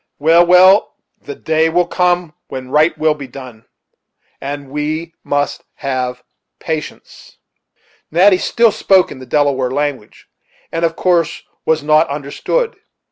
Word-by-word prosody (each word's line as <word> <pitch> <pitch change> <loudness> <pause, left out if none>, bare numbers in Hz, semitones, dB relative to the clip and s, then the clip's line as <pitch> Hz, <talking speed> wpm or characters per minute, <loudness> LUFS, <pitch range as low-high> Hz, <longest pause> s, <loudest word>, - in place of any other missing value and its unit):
Well, 165 +4 +5
well 185 +3 +5 0.3
the 430 - -8
day 160 - +1
will 175 +2 +2
come 180 -3 0
when 130 -1 -8
right 155 +3 +3
will 155 0 +2
be 145 -3 -9
done; 125 -4 -12 0.8
and 140 0 -6
we 155 +3 -3
must 145 0 -2
have 125 -2 -3 0.4
patience." 160 -2 -7 0.7
Natty 185 +3 +4
still 230 +3 +2
spoke 190 -2 +2
in 130 - -9
the 130 - -11
Delaware 135 -2 +1
language, 140 -5 -4 0.5
and 165 0 -3
of 165 -1 +1
course 175 -3 0 0.2
was 160 -2 +1
not 155 +2 +3
understood. 395 - -2
155 Hz, 135 wpm, -16 LUFS, 140-175 Hz, 0.8 s, Well